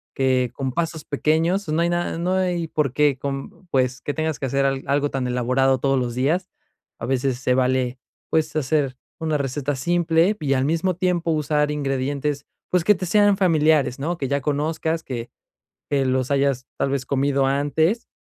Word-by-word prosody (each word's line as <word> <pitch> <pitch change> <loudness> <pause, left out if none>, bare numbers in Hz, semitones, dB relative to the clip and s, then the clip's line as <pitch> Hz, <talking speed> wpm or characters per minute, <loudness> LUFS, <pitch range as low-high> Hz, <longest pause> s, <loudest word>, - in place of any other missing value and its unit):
que 130 -2 +2
con 130 0 -3
pasos 165 0 -2
pequeños, 165 +6 +1
no 155 +2 +1
hay 170 - +2
nada, 175 -1 -1
no 175 +2 0
hay 180 -3 0
por 150 -5 -1
qué 145 -1 +3
con 135 +6 -6
pues 130 -4 0
que 145 - -3
tengas 160 -1 -2
que - - -2
hacer 135 +2 +1
al 135 -1 0
algo 145 +1 +1
tan 130 -2 -2
elaborado 130 +2 +2
todos 135 +1 +1
los 120 -1 -2
días. 160 +9 0 0.5
A - - -4
veces 130 0 0
se 130 -1 +1
vale, 130 0 +1 0.3
pues 160 -1 +1
hacer 140 -3 0 0.2
una 155 -2 0
receta 140 +1 -2
simple 170 +6 +2
y 140 -3 0
al 130 0 +1
mismo 165 +4 0
tiempo 175 -2 0
usar 150 -1 +1
ingredientes, 140 0 -2 0.2
pues 180 -2 +2
que 210 +4 +5
te 185 - -4
sean 205 +2 +4
familiares, 155 -7 +3
¿no? 165 +5 -2
Que 135 - -2
ya 140 +1 0
conozcas 160 +3 -1
que 120 -2 -5 0.6
que 140 -2 +2
los 130 0 0
hayas 140 -2 +1
tal 135 - 0
vez 135 -2 -2
comido 140 0 +1
antes 145 - +1
145 Hz, 185 wpm, -22 LUFS, 135-165 Hz, 0.6 s, que